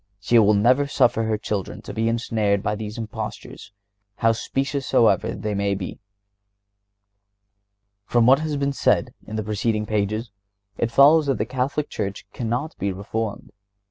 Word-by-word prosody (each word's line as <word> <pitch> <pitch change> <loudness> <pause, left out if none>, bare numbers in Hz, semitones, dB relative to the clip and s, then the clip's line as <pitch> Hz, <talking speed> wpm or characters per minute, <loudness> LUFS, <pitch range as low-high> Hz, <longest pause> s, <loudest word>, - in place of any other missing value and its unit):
She 115 +4 +4
will 105 -1 +5
never 125 +7 +3
suffer 120 -5 +2
her 110 -1 0
children 105 -3 -4
to - - -8
be 110 +1 0
ensnared 110 -3 0
by 105 - 0
these 105 +1 -6
impostures, 110 -2 -7 0.4
how 115 +2 +3
specious 135 +4 -2
soever 115 - +3
they 105 -1 -3
may 100 0 0
be. 95 -2 -6 2.1
From 120 -1 +3
what 135 +3 +6
has 155 -2 -2
been 140 0 0
said - - +1
in 110 - -6
the 110 - -2
preceding 105 +1 -1
pages, 110 +2 -2 0.4
it 115 - -1
follows 145 +5 +6
that 135 -4 +1
the 105 - -1
Catholic 130 +5 -2
Church 100 -1 -4
cannot 120 +6 -3
be 100 - -1
reformed. 105 +3 -4
110 Hz, 155 wpm, -23 LUFS, 105-125 Hz, 2.1 s, what